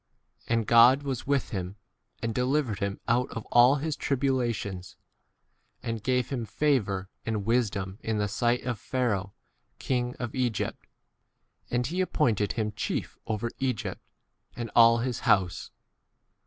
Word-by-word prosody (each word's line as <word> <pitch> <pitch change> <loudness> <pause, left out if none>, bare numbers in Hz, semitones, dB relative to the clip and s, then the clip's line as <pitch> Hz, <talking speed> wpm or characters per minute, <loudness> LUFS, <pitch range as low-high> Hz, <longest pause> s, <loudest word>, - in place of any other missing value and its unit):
And 115 -1 +1
God 120 +6 +6
was 130 -3 -4
with 140 -2 0
him, 95 -2 -3 0.5
10 - - -14
and 115 -1 -1
delivered 125 -3 0
him 100 -1 -2
out 125 +2 +2
of 115 -1 -6
all 120 +3 +7
his 150 +1 -2
tribulations, 120 -10 -1 0.9
and 115 -3 -3
gave 125 +1 0
him 130 -4 -2
favour 105 -8 0
and 110 -3 -2
wisdom 105 -4 0
in 110 -1 -1
the 105 0 +1
sight 120 +4 0
of 120 -4 -3
Pharaoh 110 -7 -1 0.4
king 125 -1 -1
of 120 -2 -4
Egypt, 125 -4 -2 0.8
and 120 0 0
he 175 +8 -1
appointed 115 - +1
him 110 -2 -1
chief 105 - -4
over 110 +1 -2
Egypt 130 -5 -2 0.5
and 115 -2 -5
all 115 0 +7
his 120 +1 -2
11 - - -11
house. 90 -2 -7
120 Hz, 145 wpm, -28 LUFS, 105-130 Hz, 0.9 s, all